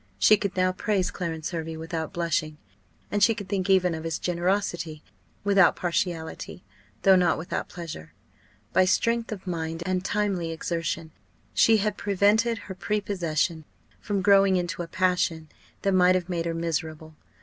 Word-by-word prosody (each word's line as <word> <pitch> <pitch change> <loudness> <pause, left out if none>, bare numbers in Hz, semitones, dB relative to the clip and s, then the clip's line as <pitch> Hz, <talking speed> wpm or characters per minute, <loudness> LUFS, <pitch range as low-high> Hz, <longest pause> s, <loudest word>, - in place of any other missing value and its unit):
She 215 - +6
could 200 -2 -4
now 185 0 +3
praise 190 0 -1
Clarence 165 -2 -4
Hervey 165 -2 -4
without 160 0 -4
blushing, 160 -2 -1 0.5
and 205 - 0
she 225 0 +5
could 205 - -7
think 195 0 -2
even 185 -2 +4
of 160 0 -5
his 165 -1 -2
generosity 175 -3 -1 0.4
without 200 -2 +5
partiality, 175 -2 -3 0.4
though 195 -1 +7
not 180 -2 +3
without 160 - -4
pleasure. 165 - -8 0.6
By 185 - +5
strength 230 +4 +1
of 200 -3 -6
mind, 165 -2 -3
and 185 0 -1
timely 195 -4 -1
exertion, 165 0 -3 0.4
she 225 -1 +5
had 210 -1 -1
prevented 205 +4 +2
her 190 - -6
prepossession 180 -5 -1 0.4
from 200 -2 -2
growing 195 -1 +5
into 175 -1 -2
a 170 - -5
passion 170 -3 0 0.3
that 195 - +2
might 185 0 +5
have 180 -1 -2
made 170 -2 -2
her 165 - -2
miserable. 160 -1 -3
180 Hz, 155 wpm, -26 LUFS, 165-195 Hz, 0.6 s, though